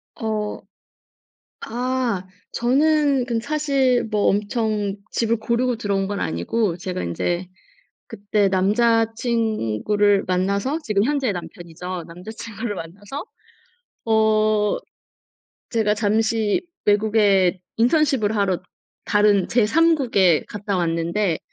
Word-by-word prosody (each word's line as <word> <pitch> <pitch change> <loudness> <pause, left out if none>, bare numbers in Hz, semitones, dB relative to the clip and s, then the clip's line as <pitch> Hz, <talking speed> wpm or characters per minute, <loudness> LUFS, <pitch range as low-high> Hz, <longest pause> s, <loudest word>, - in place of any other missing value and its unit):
어 215 -2 -3 1.0
아 245 -5 -2 0.3
저는 280 +1 +2
그 235 -2 -1
사실 270 -2 +1
뭐 210 -2 0
엄청 210 -1 0
집을 230 0 +1
고르고 235 +2 0
들어온 200 -3 -1
건 205 - -3
아니고 165 - -1
제가 185 - -4
인제 175 - -2 0.6
그때 205 -2 0
남자친구를 215 - +1
만나서 200 - 0
지금 210 -4 +1
현재의 275 -4 0
남편이죠. 175 0 -7
남자친구를 215 +5 -7
만나서 205 - -7 0.8
어 215 -1 +2 0.9
제가 220 -3 +1
잠시 215 +2 +1 0.2
외국에 205 -3 +3 0.2
인턴십을 245 -3 +2
하러 195 -3 0 0.4
다른 205 -2 +3
제 235 -3 +3
3 330 +7 +4
국에 195 - +2
갔다 205 -1 -3
왔는데 170 +1 0
210 Hz, 215 characters per minute, -22 LUFS, 195-235 Hz, 1.0 s, 3